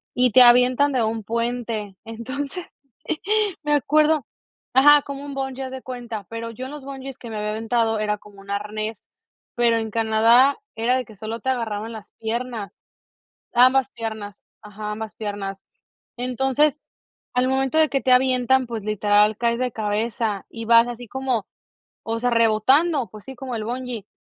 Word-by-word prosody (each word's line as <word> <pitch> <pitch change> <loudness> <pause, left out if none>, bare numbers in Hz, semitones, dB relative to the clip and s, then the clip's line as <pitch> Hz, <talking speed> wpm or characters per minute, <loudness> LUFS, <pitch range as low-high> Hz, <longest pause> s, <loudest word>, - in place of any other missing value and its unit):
y 250 -2 +3
te 255 - +7
avientan 250 +3 +6
de 245 - +2
un 220 0 -2
puente, 230 -3 -3
entonces 265 +9 -5 1.0
me 295 0 +1
acuerdo 305 0 +3 0.5
ajá 290 +2 +8
como 280 0 -7
un 285 - -6
bungee 270 -1 -4
haz 260 - -6
de 260 -1 -7
cuenta, 240 -5 -6
pero 230 0 -5
yo 255 +3 -7
en 265 - -7
los 295 -2 -8
bungees 270 -1 -7
que 235 - -9
me 220 - -5
había 210 0 -2
aventado 225 0 0
era 210 0 0
como 205 -1 -17
un 200 - -16
arnés, 210 +1 -4 0.5
pero 235 -1 +3
en 220 -1 -3
Canadá 230 +5 +4 0.2
era 235 +3 +1
de 255 - -3
que 220 - -14
solo 220 +3 -5
te 260 - -2
agarraban 225 -3 -2
las 215 -2 -10
piernas, 230 -1 -4 0.8
ambas 255 +2 +5
piernas 220 -3 -6 0.2
ajá, 210 0 -6
ambas 220 0 -6
piernas. 200 -2 -5 0.6
Entonces, 265 +4 +1 0.6
al 250 +1 +3
momento 265 +2 0
de 315 - +5
que 275 - 0
te 255 - +1
avientan, 255 0 +3
pues, 225 -3 -5
literal, 210 0 +2
caes 235 0 0
de 250 -1 -1
cabeza 215 -1 -2
y 230 -1 -7
vas 230 +1 +6
así 240 0 -7
como, 255 -3 -2 0.6
o 225 0 -2
sea, 245 - +1
rebotando, 240 - +3
pues, 215 -1 -12
sí, 265 - -8
como 255 -1 -6
el 215 - -4
bungee, 245 -3 -5
235 Hz, 170 wpm, -23 LUFS, 220-260 Hz, 1.0 s, ajá